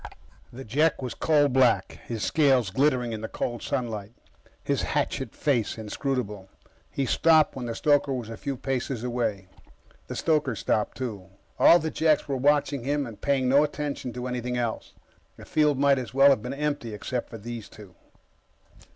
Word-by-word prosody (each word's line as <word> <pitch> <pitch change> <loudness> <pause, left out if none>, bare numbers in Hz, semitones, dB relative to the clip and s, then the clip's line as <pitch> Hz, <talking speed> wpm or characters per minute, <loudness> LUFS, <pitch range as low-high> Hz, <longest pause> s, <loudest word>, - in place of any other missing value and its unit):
The 130 +2 -9
Jek 140 +5 +1
was 125 - -4
coal 150 -2 +3
black, 130 -3 +2
his 115 -3 -4
scales 135 -9 +3
glittering 125 -1 +1
in 110 - -5
the 110 - -4
cold 120 +1 -4
sunlight, 115 -5 -3 0.5
his - - 0
hatchet - - -2
face 125 -8 0
inscrutable. 105 -3 -3 0.4
He 135 - -2
stopped 160 +4 +4
when 125 -2 -5
the 115 - -4
stoker 145 -1 +2
was 125 -4 -3
a 115 - -7
few 135 +3 -4
paces 130 -2 -3
away. 115 -6 -2 0.6
The - - -6
stoker 150 -6 +1
stopped, 105 +1 -1
too. 105 -8 -5 0.3
All 170 - +8
the 160 -2 -3
Jeks 155 -1 +2
were 140 -2 -1
watching 140 -1 +2
him 145 +2 0
and 115 -4 -10
paying 135 -2 +1
no 140 +3 +5
attention 145 -4 -3
to 125 0 -5
anything 125 0 -3
else. 120 -2 -3 0.4
The - - -12
field 150 -2 +2
might 140 -1 +3
as 125 0 -7
well 140 +1 +7
have 130 - +2
been 125 +3 -5
empty 145 -7 -3
except 120 +4 -4
for 115 - -8
those 115 0 -7
two. 105 -4 -14
130 Hz, 175 wpm, -26 LUFS, 115-140 Hz, 0.6 s, All